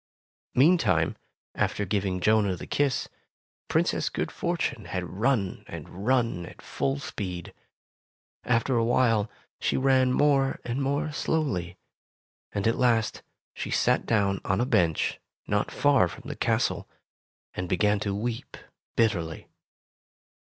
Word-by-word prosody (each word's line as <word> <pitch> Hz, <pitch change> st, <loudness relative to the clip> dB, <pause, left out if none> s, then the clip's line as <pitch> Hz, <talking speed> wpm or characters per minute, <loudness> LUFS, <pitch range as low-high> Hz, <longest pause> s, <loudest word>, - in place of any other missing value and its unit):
Meantime, 125 Hz, -, +4 dB, 0.4 s
after 105 Hz, -, 0 dB
giving 95 Hz, -1 st, -1 dB
Jonah 105 Hz, 0 st, +3 dB
the -, -, -8 dB
kiss. 140 Hz, -3 st, 0 dB, 0.6 s
Princess -, -, +1 dB
Good -, -, -3 dB
Fortune -, -, -2 dB
had 90 Hz, -, -3 dB
run 100 Hz, 0 st, 0 dB
and 100 Hz, +5 st, -8 dB
run 115 Hz, -9 st, +1 dB
at -, -, -13 dB
full 135 Hz, +1 st, -2 dB
speed. 90 Hz, -10 st, -5 dB, 0.9 s
After 125 Hz, +2 st, +1 dB
a 115 Hz, -, +3 dB
while, 115 Hz, -3 st, +2 dB, 0.3 s
she -, -, 0 dB
ran 130 Hz, -1 st, +3 dB
more 135 Hz, 0 st, +3 dB
and 125 Hz, +3 st, -2 dB
more 140 Hz, +3 st, 0 dB
slowly, 95 Hz, -, -1 dB, 0.7 s
and 100 Hz, -, -2 dB
at 115 Hz, -, +2 dB
last 115 Hz, -3 st, +2 dB, 0.3 s
she -, -, -5 dB
sat -, -, +2 dB
down 100 Hz, -3 st, +2 dB
on 95 Hz, +1 st, 0 dB
a 120 Hz, -, +2 dB
bench 85 Hz, -, +1 dB, 0.3 s
not 105 Hz, 0 st, 0 dB
far 140 Hz, -9 st, +3 dB
from -, -, -10 dB
the -, -, -5 dB
castle, -, -, 0 dB, 0.6 s
and 90 Hz, -1 st, -4 dB
began 105 Hz, +3 st, +2 dB
to 100 Hz, -1 st, -2 dB
weep 115 Hz, +2 st, -4 dB, 0.4 s
bitterly. 90 Hz, -8 st, 0 dB
110 Hz, 130 wpm, -27 LUFS, 95-130 Hz, 0.9 s, Meantime